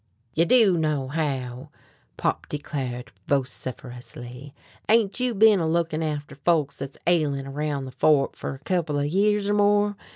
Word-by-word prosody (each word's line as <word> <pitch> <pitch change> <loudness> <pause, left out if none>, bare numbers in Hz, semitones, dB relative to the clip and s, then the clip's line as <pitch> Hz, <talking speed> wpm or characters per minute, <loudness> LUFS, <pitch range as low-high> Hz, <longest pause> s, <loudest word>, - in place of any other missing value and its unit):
"You 165 - +3
do 205 -5 +5
know 150 -4 0
how," 135 -5 -3 0.5
Pop - - -1
declared 130 -4 -4 0.2
vociferously; 125 -1 -4 0.4
"ain't 220 -1 +3
you 250 -2 0
bin 210 -1 +6
a 165 - 0
lookin' 165 -1 0
after 150 -2 -3
folks 145 0 0
thet's 135 0 -6
ailin' 150 -6 +1
around 140 0 -3
the 130 - -8
Fork 135 +2 +2
fer - - -5
a - - -14
couple 160 -2 -1
of 145 - 0
years 200 +5 +2
or 205 - +2
more? 205 0 +3
150 Hz, 155 wpm, -25 LUFS, 135-185 Hz, 0.5 s, bin